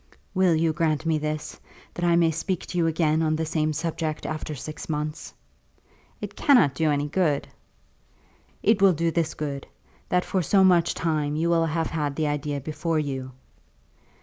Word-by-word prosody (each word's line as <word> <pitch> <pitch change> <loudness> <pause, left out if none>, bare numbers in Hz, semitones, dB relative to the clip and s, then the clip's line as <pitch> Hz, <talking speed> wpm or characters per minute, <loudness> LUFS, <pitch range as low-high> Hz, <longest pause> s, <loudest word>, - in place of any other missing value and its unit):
"Will 185 -3 +3
you 160 0 +1
grant 155 0 0
me 160 -1 +1
this; 150 0 -4 0.3
that 175 - -5
I 170 -1 +4
may 170 -1 +4
speak 165 +3 -3
to 180 - -5
you 165 - +3
again 160 -1 +1
on 155 -1 +1
the 160 +1 -1
same 155 -1 0
subject 160 0 -3
after 155 -1 -4
six 155 +4 -8
months?" 150 +1 -3 0.9
"It - - -6
cannot 245 - +4
do 155 +3 +1
any 145 0 0
good." 150 -3 0 1.2
"It 210 -1 +3
will 195 -2 +6
do 165 +1 0
this 165 -1 -1
good; 140 -2 -4 0.4
that 180 0 +1
for 190 - 0
so 190 +4 +4
much 175 -2 +4
time 155 -3 -1
you 165 +2 +1
will 165 -1 +3
have 160 +1 -1
had 150 -3 -2
the 155 - 0
idea 145 -1 -2
before 160 +3 -2
you." 135 -3 -3
160 Hz, 175 wpm, -25 LUFS, 150-170 Hz, 1.2 s, will